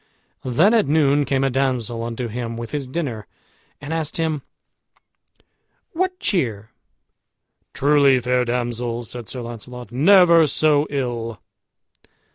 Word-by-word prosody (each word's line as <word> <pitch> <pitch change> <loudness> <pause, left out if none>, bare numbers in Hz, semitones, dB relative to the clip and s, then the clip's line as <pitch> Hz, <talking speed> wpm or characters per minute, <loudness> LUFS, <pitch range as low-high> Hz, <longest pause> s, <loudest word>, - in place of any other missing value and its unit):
Then 155 - +3
at 225 -3 +3
noon 145 -1 +3
came 135 0 0
a 135 - +1
damsel 125 -3 -1
unto 120 +1 -4
him 115 0 -5
with 115 -1 -7
his 145 -3 -3
dinner, 130 - -4 0.5
and 150 +2 -6
asked 160 -2 -3
him, 160 -3 -1 1.5
"What 365 +2 -1
cheer?" 110 - -1 1.0
"Truly, 140 -2 +4
fair 125 +1 +1
damsel," 120 -1 -2
said 120 0 -8
Sir 125 +6 -6
Launcelot, 120 +1 -9
"never 170 +3 +5
so 150 0 +2
ill." 120 -6 -3
130 Hz, 120 wpm, -21 LUFS, 120-150 Hz, 1.5 s, never